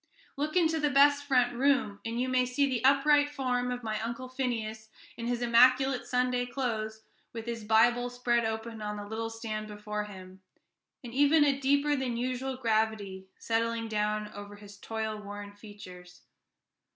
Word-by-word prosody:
Look 300 +3 -3
into 325 -3 +3
the 295 -1 +2
best 285 +1 +4
front 250 -3 +2
room, 265 -6 +1
and 230 +1 -3
you 255 - 0
may 255 0 +2
see 255 +3 +1
the 255 -3 -2
upright 290 +2 +4
form 250 -3 -1
of 245 0 -4
my 215 -1 -2
Uncle 235 +3 -4
Phineas, 225 -4 -3 0.3
in 235 - -5
his 245 0 -1
immaculate 255 +2 +4
Sunday 250 0 0
clothes, 220 -4 -3 0.3
with 225 -1 -6
his 235 -2 -5
Bible 235 +3 +3
spread 245 -1 0
open 220 0 -4
on 210 0 -4
the 205 - -6
little 220 +2 -4
stand 220 -1 -5
before 210 0 -5
him, 190 -2 -12 0.6
and 235 -2 -8
even 290 +3 +5
a 280 -2 +2
deeper 285 +2 +2
than 255 -4 -2
usual 255 +2 -2
gravity 215 -5 -1
settling 230 0 -1
down 210 -1 -1
over 205 0 -9
his 205 -1 -13
toil 220 -1 -4
worn 205 0 -8
features. 185 -4 -13
235 Hz, 165 wpm, -29 LUFS, 215-255 Hz, 0.6 s, even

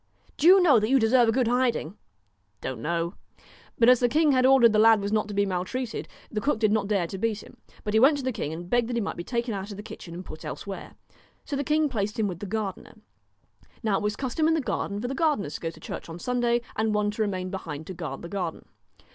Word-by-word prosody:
* - - -33
Do 315 - +3
you 380 +2 +9
know 285 -9 +6
that 215 +1 -1
you 270 - +5
deserve 235 0 +4
a - - +5
good 250 0 +1
hiding.' 245 -8 +1
1 200 - -17 0.6
Don't 125 -4 -5
know.' 170 +3 -1 0.6
But 230 - +4
as 250 -1 +7
the 245 - +2
king 305 +2 +3
had 255 -1 +4
ordered 265 -3 +7
that 215 -1 +2
the - - +6
lad 225 -1 +6
was 200 0 -3
not 215 -1 +1
to 205 - -6
be 200 0 +3
maltreated, 200 +6 -3 0.2
the 215 - -2
cook 290 -1 +1
did 215 -1 +2
not 210 -2 +1
dare 200 -4 +1
to 190 +3 -6
beat 220 0 -1
him; - - -16 0.3
but 210 - -3
he 220 - +5
went 280 +5 +5
to 280 - -5
the 260 - 0
king 155 -9 -4
and 170 +2 -7
begged 240 +4 +1
that 245 - -2
he - - +1
might 200 - -3
be 175 - -5
taken 235 +2 -2
out 195 +1 -5
of 200 - -7
the 205 - -7
kitchen 170 -5 -9
and 180 +1 -7
put 155 - -10
elsewhere. 195 -1 -7 0.5
So 285 - -3
the 280 - -1
king 305 +2 +2
placed 210 -5 -3
him 220 -2 +1
with 175 -3 -5
the 205 - -6
gardener. 205 -1 -4 0.9
Now 210 -3 +2
it - - -3
was 210 0 0
the - - -12
custom 275 +4 0
in 325 - +3
the - - +1
garden 205 -6 -2
for 245 - -3
the 265 - -3
gar 310 +1 +2
deners 150 -7 -5
to - - -6
go 165 - -2
to 160 - -12
church 165 - -7
on 165 - -7
Sunday, 240 +3 0
and 220 0 0
one 210 0 +1
to 210 - -4
remain 185 -3 -2
behind 160 -5 -6
to 190 - -7
guard 165 -5 -6
the - - -5
garden. 180 -4 -4
215 Hz, 280 wpm, -26 LUFS, 190-250 Hz, 0.9 s, you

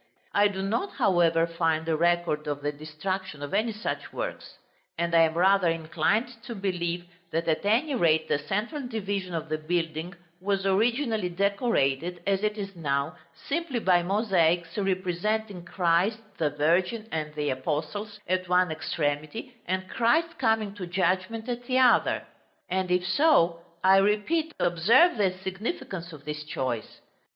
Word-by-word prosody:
I 205 0 +5
do 190 -1 -4
not, 230 - -1
however, 170 -3 +3
find 165 -1 0
record 165 -1 +1
of 145 -1 -3
the 145 - 0
destruction 155 +2 -5
of 145 - -6
any 220 +3 +1
such 215 +1 -4
works; - - -6 0.4
and 170 0 -1
I 165 - +6
am 160 0 +3
rather 185 0 +4
inclined 170 +9 0
to 235 - -6
believe 175 -3 -2 0.2
that 165 +1 -2
at 160 -1 +1
any 240 +9 +2
rate 160 -9 +3
the 145 - +1
central 210 - -2
division 200 -5 -3
of 160 -1 -3
the 155 0 -2
building 165 +1 -2 0.2
was 195 +1 -1
originally 220 0 +1
decorated, 180 - 0
as 195 -1 +1
it 215 0 -1
is 200 -1 -5
now, 140 -3 -1 0.3
simply 315 -3 -1
by 185 -6 +3
mosaics 175 -4 +1
representing 195 0 -1
Christ, 180 +4 +2 0.2
the 155 -2 +2
Virgin, 175 +9 +1
and 155 -1 -3
the 150 -1 -1
apostles, 155 +10 -3
at 185 0 -1
one 180 -1 +3
extremity, 155 - -3
and 185 +1 -1
Christ 320 - +1
coming 220 -4 +1
to 180 -3 -5
judgment 185 +5 0
at 245 0 -4
the 255 - +1
other. 255 -2 +4 0.4
And 185 0 -1
if 180 0 +2
so, 185 - +3 0.2
I 190 +1 +7
repeat, 215 +12 +1
observe 225 - +4
the 195 -3 +3
significance 195 - -4
of 145 -3 -12
this 150 0 -4
choice. 130 -6 -4
185 Hz, 150 wpm, -27 LUFS, 165-215 Hz, 0.4 s, I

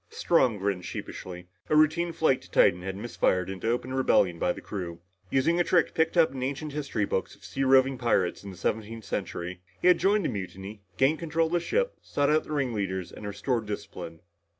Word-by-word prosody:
Strong 165 - +2
grinned 95 -2 -1
sheepishly. 90 0 -7 0.2
A 155 - +3
routine 155 +3 +3
flight 160 -5 +2
to - - -16
Titan 90 - +4
had 95 +1 -4
misfired 95 -4 0
into 95 +4 -3
open 125 +2 -1
rebellion 95 -9 +3
by 90 - +2
the - - -6
crew. 90 -4 -6 0.3
Using 165 +6 +2
a - - +5
trick 175 -1 +2
picked 165 +2 +1
up 165 -2 +5
in 135 -1 -6
ancient 140 +3 -3
history 140 -8 -1
books 95 - -2
of - - -17
sea 135 - -2
roving 135 -1 +4
pirates 100 -8 +1
in 100 - -7
the 95 - -10
seventeenth 110 +4 -3
century, 90 -3 -4 0.2
he 180 - +4
had 180 - +5
joined 200 +2 +2
the - - +1
mutiny, 95 +2 -6 0.2
gained 140 +4 +3
control 165 0 0
of 160 - -4
the 175 - +3
ship, 485 - 0
sought 145 0 0
out 155 +1 +2
the - - -9
ring 140 -5 0
leaders 95 -4 -3
and 105 - -8
restored 110 +3 -2
discipline. 85 -5 -7
120 Hz, 210 wpm, -28 LUFS, 95-155 Hz, 0.3 s, a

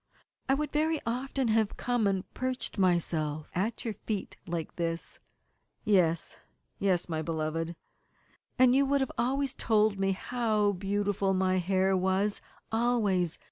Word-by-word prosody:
"I 270 - +5
would 300 +1 -2
very 310 +1 +1
often 255 +2 -1
have 220 -1 +1
come 245 -4 +1
and 190 -2 0
perched 255 -4 -3
myself 160 -4 0
at 210 +8 -2
your 225 - -1
feet 205 0 -4
like 170 -2 -4
this." 165 -1 -3 0.7
"Yes, 175 -6 +2 0.4
yes, 185 -3 +1
my 160 -2 -2
beloved." 165 +1 -2 0.8
"And 255 -1 +6
you 275 +2 +5
would 275 -1 +2
always 270 +2 +1
have - - -14
told 215 -2 +2
me 195 0 +2
how 215 -1 +1
beautiful 200 0 0
my 185 0 +2
hair 190 +1 +2
was 190 +2 +1 0.3
always. 215 -7 +1
200 Hz, 140 wpm, -30 LUFS, 180-240 Hz, 0.8 s, And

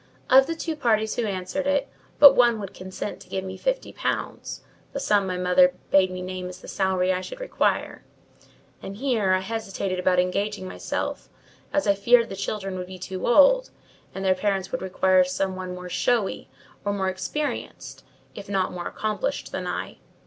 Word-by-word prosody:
Of 265 +1 +7
the 330 - -2
two 325 0 -3
parties 220 -6 +1
who 235 -2 -1
answered 195 +9 -3
it, 285 -1 +1 0.3
but 285 -2 +10
one 240 -2 +4
would 200 -2 -7
consent 185 +2 -6
to - - -15
give 190 - -3
me 190 0 -6
fifty - - -2
pounds, - - -3 0.3
the - - -2
sum 205 -2 +2
my 185 -1 -2
mother 180 +10 +4 0.2
bade 190 -1 +5
me 185 0 -5
name 185 0 -5
as 180 0 -10
the - - -13
salary 185 -1 +1
I 185 - -2
should - - -8
require; - - -1 0.8
and 195 +1 -7
here, 225 -7 +1
I 185 - +2
hesitated 195 -3 -3
about 180 0 +2
engaging 190 +2 0
myself, - - -4 0.4
as 295 - +1
I 200 - +4
feared 230 +4 +4
the 195 - -5
children 195 -1 -4
would 180 - -5
be 185 0 -9
too 185 +1 -5
old, 300 - +5 0.5
and 195 0 -4
their 190 - +5
parents 190 0 -1
would - - -2
require 185 0 +3
some 185 +1 -2
one 185 -1 -5
more 180 0 -8
showy, 215 +3 0 0.3
or 205 - 0
more 195 -1 -1
experienced, 190 +11 -4 0.3
if 200 - -9
not 190 -2 0
more 175 -1 -5
accomplished 215 - -3
than - - -4
I. - - -4
195 Hz, 185 wpm, -25 LUFS, 185-235 Hz, 0.8 s, but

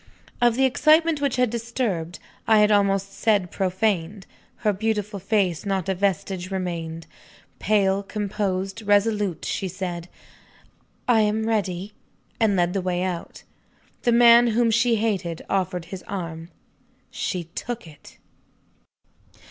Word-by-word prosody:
Of 240 -1 +4
the 265 +2 +3
excitement 310 +3 +3
which 280 -3 0
had 250 -3 +2
disturbed 225 -8 -3 0.3
I 220 - +5
had 210 0 +5
almost 195 -1 +2
said, 205 -6 +1
profaned 190 -1 -1 0.4
her 210 - +4
beautiful 210 0 -2
face, 190 -4 0
not 195 -3 -2
a 190 - +1
vestige 190 -1 -1
remained. 170 -4 -4 0.5
Pale, 200 -2 +2
composed, 195 -1 -3
resolute, 205 -3 +1
she 195 - -2
said, 180 -2 -5 1.0
"I 240 -3 +4
am 215 +1 +1
ready," 200 -3 -2 0.5
and 220 -3 +3
led 175 -1 +1
the 195 - -1
way 180 0 -1
out. 180 -2 -5 0.6
The 240 - +2
man 235 0 +7
whom 230 0 +2
she 235 +1 +3
hated 195 -7 -2
offered 185 -3 -1
his 185 - -6
arm. 165 -4 -5 0.6
She 180 -4 -3
took 240 -3 -5
it! 150 -3 -15
200 Hz, 130 wpm, -24 LUFS, 180-220 Hz, 1.0 s, man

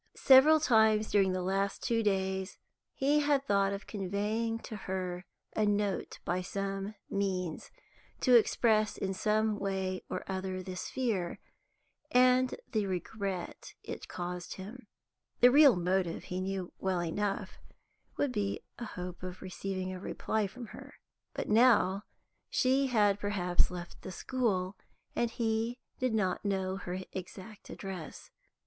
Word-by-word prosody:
Several 280 +4 +7
times 220 -5 +4
during 195 -2 +4
the 185 0 -1
last 195 +1 -1
two 230 -1 +1
days 190 -2 -1 0.4
he 285 +2 +3
had 285 -2 +2
thought 200 -4 +2
of 200 0 -5
conveying 210 +3 -1
to 220 - -7
her 185 -2 -4 0.3
a 215 - +2
note 205 -1 0
by 180 +1 0
some 195 +2 -3
means, 185 -4 -2 0.5
to 255 - +4
express 220 -2 +3
in 190 0 -2
some 215 +2 +1
way 190 -2 -2
or - - -3
other 190 -1 -3
this 185 -1 -5
fear, 215 -9 -1 0.7
and 255 -1 +4 0.2
the 215 -4 0
regret 190 0 -4
it - - -7
caused 175 -1 -5
him; 215 +5 -9 0.5
the 245 - +8
real 285 -2 +8
motive, 180 -1 0
he 180 +1 -4
knew 190 -1 -3
well 185 -2 0
enough, 195 +4 -2 0.6
would 285 - +1
be 205 -4 -1 0.2
a 240 - -4
hope 180 -3 -7
of 185 0 -6
receiving 185 0 -4
a 185 - -6
reply 215 +2 -1
from 240 +5 -9
her. - - -11 0.4
But - - -3
now 210 -4 +4 0.4
she 265 +2 +3
had 205 -5 +3
perhaps 190 -4 +1
left 175 -1 -8
the 185 - -7
school, 200 -5 -1 0.4
and 235 - +1
he 230 +1 -1 0.2
did 255 -3 +1
not 190 -4 0
know 190 -2 -1
her 180 -2 -4 0.2
exact 190 +3 -8
address. 190 -5 -7
200 Hz, 140 wpm, -31 LUFS, 185-225 Hz, 0.7 s, the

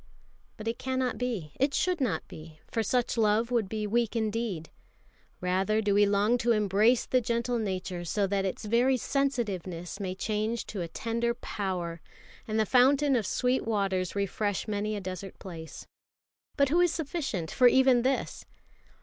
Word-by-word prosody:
But 220 0 -7
it 230 - -2
cannot 260 -1 -1
be, 225 -12 -3
it 275 +1 +2
should 360 -4 +1
not 185 -12 -1
be, 155 0 -12
for 225 - 0
such 240 +2 0
love 220 +2 +2
would 230 -6 +1
be 215 0 -2
weak 235 +2 0
indeed. 220 -7 -2 0.7
Rather 190 +4 +1
do 205 -2 +1
we 205 0 +5
long 205 +4 +2
to 230 -3 +2
brace 215 +6 +3
the 255 - +2
gentle 235 +1 -1
nature 185 -4 -3
so 200 +4 0
that 195 0 0
its 195 +3 -3
very 245 +4 +3
sensitiveness 200 -11 -2
may 185 -2 -3
change 215 +3 -2
to 200 - -5
a 170 - -3
tender 235 +6 -2
power, 180 -8 -4 0.5
and 220 0 0
the 220 - +3
fountain 270 +4 +4
of 220 -6 0
sweet 250 +1 +1
waters 195 -5 -1
refresh 200 -1 -1
many 210 0 -1
a - - -3
desert 185 0 -7
place. 165 -4 -9 0.7
But 280 -2 +4
who 335 +5 +3
is 350 -2 +4
sufficient 275 - -3
for 250 - +5
even 260 -1 +5
this? 265 +2 -2
215 Hz, 165 wpm, -29 LUFS, 195-245 Hz, 0.7 s, we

